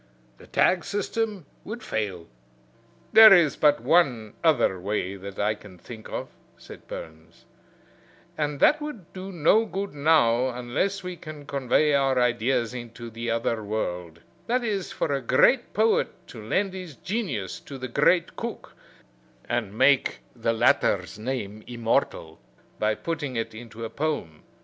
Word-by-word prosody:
The -, -, -15 dB
tag 180 Hz, -2 st, +2 dB
system 205 Hz, -2 st, -2 dB, 0.2 s
would 220 Hz, +3 st, -7 dB
fail." 95 Hz, -6 st, -3 dB, 0.9 s
"There 220 Hz, 0 st, +10 dB
is 170 Hz, -7 st, +6 dB
but 150 Hz, -1 st, +4 dB
one 125 Hz, -11 st, +2 dB
other 120 Hz, -, +3 dB
way 100 Hz, 0 st, -2 dB
that 100 Hz, 0 st, -9 dB
I 105 Hz, +1 st, +1 dB
can 100 Hz, -3 st, -14 dB
think 110 Hz, +4 st, -11 dB
of," -, -, -5 dB, 0.3 s
said -, -, -13 dB
Burns, 80 Hz, +1 st, -10 dB, 0.9 s
"and 150 Hz, -2 st, -2 dB
that 305 Hz, +1 st, +5 dB
would 245 Hz, -, -8 dB
do 190 Hz, +1 st, -7 dB
no 175 Hz, +6 st, +4 dB
good 195 Hz, -2 st, -4 dB
now 140 Hz, -5 st, +3 dB
unless 130 Hz, +11 st, -2 dB
we 180 Hz, 0 st, -5 dB
can 155 Hz, -3 st, -10 dB
convey 140 Hz, +2 st, +1 dB
our 135 Hz, -2 st, +2 dB
ideas 120 Hz, -1 st, +1 dB
into 120 Hz, -1 st, -8 dB
the 115 Hz, +1 st, -5 dB
other 115 Hz, -1 st, -1 dB
world; 90 Hz, -6 st, -4 dB, 0.3 s
that 245 Hz, +1 st, +1 dB
is, 200 Hz, -5 st, -2 dB
for 145 Hz, -, -1 dB
a 135 Hz, -, -1 dB
great 240 Hz, -, +3 dB
poet 220 Hz, +1 st, +2 dB, 0.2 s
to 110 Hz, -3 st, -10 dB
lend 190 Hz, -, 0 dB
his 180 Hz, -6 st, -8 dB
genius 165 Hz, -, -3 dB
to 140 Hz, -, -10 dB
the 130 Hz, 0 st, -5 dB
great 170 Hz, +8 st, +2 dB
cook, 235 Hz, -1 st, -6 dB, 0.7 s
and 110 Hz, -4 st, -2 dB
make 135 Hz, +1 st, +3 dB
the 115 Hz, -1 st, 0 dB
latter's 115 Hz, -1 st, +2 dB
name 110 Hz, -3 st, -4 dB
immortal 115 Hz, -2 st, -1 dB, 0.4 s
by 110 Hz, 0 st, +1 dB
putting 150 Hz, -4 st, -4 dB
it 115 Hz, -1 st, -3 dB
into 115 Hz, 0 st, -8 dB
a -, -, -5 dB
poem. 140 Hz, -, -3 dB
130 Hz, 150 wpm, -25 LUFS, 110-175 Hz, 0.9 s, There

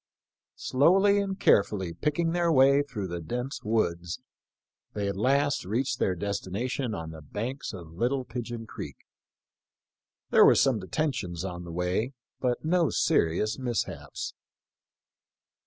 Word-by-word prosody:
Slowly 195 Hz, +9 st, +4 dB
and 195 Hz, -1 st, -2 dB
carefully 95 Hz, -4 st, +3 dB
picking 155 Hz, -, 0 dB
their 170 Hz, -1 st, +2 dB
way 140 Hz, 0 st, +6 dB
through 125 Hz, -9 st, -5 dB
the 85 Hz, -1 st, -5 dB
dense 125 Hz, -, -4 dB
woods, 85 Hz, -5 st, -1 dB, 0.7 s
they 100 Hz, -1 st, -2 dB
at 100 Hz, -, -2 dB
last 140 Hz, +7 st, +2 dB
reached 120 Hz, +6 st, -1 dB
their 95 Hz, -, +1 dB
destination 105 Hz, +6 st, -2 dB
on 80 Hz, -1 st, -6 dB
the 80 Hz, -1 st, -10 dB
banks 115 Hz, -, -4 dB
of 85 Hz, -5 st, -9 dB
Little 125 Hz, +10 st, 0 dB
Pigeon 120 Hz, -1 st, -5 dB
creek. -, -, -8 dB, 1.3 s
There -, -, +7 dB
were -, -, +7 dB
some 130 Hz, -5 st, +3 dB
detentions 95 Hz, -, -2 dB
on 90 Hz, -2 st, -5 dB
the 85 Hz, -, -7 dB
way, 90 Hz, +9 st, -1 dB, 0.3 s
but 125 Hz, +3 st, -1 dB
no 170 Hz, -1 st, +3 dB
serious 85 Hz, +9 st, +1 dB
mishaps. 120 Hz, -4 st, -3 dB
115 Hz, 130 wpm, -28 LUFS, 95-140 Hz, 1.3 s, There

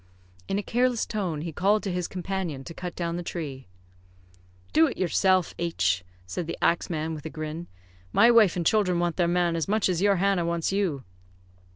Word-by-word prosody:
In 195 Hz, -, -1 dB
a 205 Hz, -, -2 dB
careless 245 Hz, +1 st, +1 dB
tone, 180 Hz, -8 st, -3 dB
he 165 Hz, +1 st, -4 dB
called 205 Hz, +6 st, +2 dB
to 195 Hz, -, -2 dB
his 180 Hz, -1 st, -2 dB
companion 180 Hz, -6 st, -4 dB
to 165 Hz, -, -9 dB
cut 180 Hz, 0 st, -6 dB
down 170 Hz, -1 st, -2 dB
the -, -, -3 dB
tree. 145 Hz, -, -6 dB, 1.1 s
"Do 160 Hz, 0 st, +6 dB
it -, -, -5 dB
yourself, 185 Hz, 0 st, +2 dB
H 100 Hz, -, 0 dB
," 90 Hz, 0 st, -30 dB
said 125 Hz, -, -4 dB
the -, -, -4 dB
axe 170 Hz, -, +1 dB
man, 160 Hz, -1 st, -2 dB
with 155 Hz, 0 st, -6 dB
a -, -, -6 dB
grin. 155 Hz, +2 st, -6 dB, 0.4 s
"My 235 Hz, -, +6 dB
wife 220 Hz, -6 st, +5 dB
and 175 Hz, -2 st, -2 dB
children 185 Hz, -2 st, +3 dB
want 175 Hz, -1 st, 0 dB
their 175 Hz, -2 st, +2 dB
man 175 Hz, -1 st, +1 dB
as 165 Hz, -, -1 dB
much 215 Hz, +1 st, +2 dB
as 180 Hz, -1 st, 0 dB
your 200 Hz, 0 st, +4 dB
Hannah 195 Hz, -1 st, +2 dB
wants 170 Hz, 0 st, -1 dB
you." 185 Hz, -9 st, -1 dB
175 Hz, 205 wpm, -26 LUFS, 160-195 Hz, 1.1 s, Do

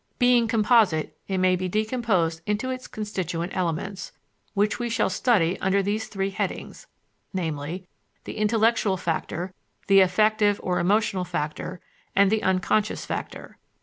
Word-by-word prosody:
Being 245 Hz, -2 st, +4 dB
composite, 215 Hz, -7 st, +3 dB
it 190 Hz, -, -1 dB
may 185 Hz, 0 st, +3 dB
be 185 Hz, 0 st, -3 dB
decomposed 215 Hz, -6 st, 0 dB
into 210 Hz, +5 st, -1 dB
its 255 Hz, 0 st, -6 dB
constituent 185 Hz, -5 st, -4 dB
elements, 185 Hz, +2 st, -3 dB, 0.4 s
which 210 Hz, +3 st, +1 dB
we 240 Hz, -1 st, -2 dB
shall 225 Hz, -4 st, +1 dB
study 185 Hz, -6 st, +2 dB
under 195 Hz, +1 st, +2 dB
these 210 Hz, +3 st, -1 dB
three 195 Hz, -1 st, -2 dB
headings, -, -, -4 dB, 0.5 s
viz., 160 Hz, 0 st, -3 dB, 0.4 s
the -, -, -7 dB
intellectual 220 Hz, -2 st, +2 dB
factor, 175 Hz, +1 st, -3 dB, 0.3 s
the 195 Hz, 0 st, +6 dB
affective 205 Hz, +2 st, +3 dB
or 180 Hz, -1 st, 0 dB
emotional 200 Hz, +1 st, +1 dB
factor, 175 Hz, +1 st, -4 dB, 0.3 s
and 200 Hz, 0 st, +5 dB
the 220 Hz, -1 st, +2 dB
unconscious 190 Hz, +3 st, +1 dB
factor. -, -, -6 dB
195 Hz, 135 wpm, -25 LUFS, 180-215 Hz, 0.5 s, the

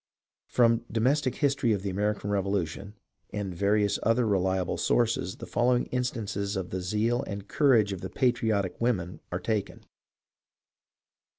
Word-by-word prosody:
From 115 Hz, -1 st, +3 dB
" -, -, -15 dB
Domestic 130 Hz, +4 st, +1 dB
History 140 Hz, -5 st, +2 dB
of 100 Hz, -2 st, -2 dB
the 100 Hz, -, -2 dB
American 105 Hz, +1 st, -1 dB
Revolution 100 Hz, 0 st, -2 dB, 0.2 s
" -, -, -47 dB
and 95 Hz, -3 st, -3 dB
various 100 Hz, +3 st, +1 dB
other 115 Hz, +2 st, +2 dB
reliable 95 Hz, -3 st, 0 dB
sources 115 Hz, -6 st, +1 dB
the -, -, -8 dB
following 125 Hz, 0 st, +2 dB
instances 105 Hz, -5 st, -2 dB
of 95 Hz, -2 st, -4 dB
the 95 Hz, -, -2 dB
zeal 110 Hz, +6 st, 0 dB
and 100 Hz, 0 st, -6 dB
courage 115 Hz, -9 st, +3 dB
of 95 Hz, -, -7 dB
the -, -, -5 dB
patriotic 110 Hz, -8 st, 0 dB
women 95 Hz, -7 st, -1 dB
are 90 Hz, -, -2 dB
taken. 105 Hz, +1 st, -3 dB
105 Hz, 150 wpm, -28 LUFS, 95-120 Hz, 0.2 s, From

